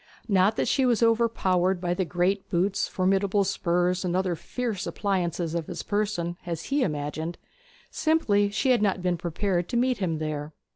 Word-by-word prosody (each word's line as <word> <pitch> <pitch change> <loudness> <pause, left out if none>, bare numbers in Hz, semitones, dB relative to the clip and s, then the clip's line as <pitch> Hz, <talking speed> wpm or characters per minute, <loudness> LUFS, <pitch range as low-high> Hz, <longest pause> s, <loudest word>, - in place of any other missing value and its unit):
Not 200 0 +3
that - - 0
she 270 - +2
was 240 -2 +3
overpowered 195 -6 +2
by 175 -1 -1
the 185 +1 -1
great 180 +3 0
boots, 190 +3 +1
formidable 195 +2 +1
spurs, 180 -1 0
and 180 -1 -1
other 185 -2 +1
fierce 220 +2 -4
appliances 175 -4 -1
of 170 -2 -2
his - - -5
person, 200 -5 -1
as 170 -2 -4
he 290 - +3
imagined; 155 - -2 0.5
simply 270 -11 +2
she 235 +6 +1
had 245 - +3
not 195 -3 +1
been 180 -1 +1
prepared 175 +1 -1
to 240 - 0
meet 250 0 +1
him 170 -5 -1
there. 155 -1 -4
185 Hz, 175 wpm, -26 LUFS, 175-210 Hz, 0.5 s, Not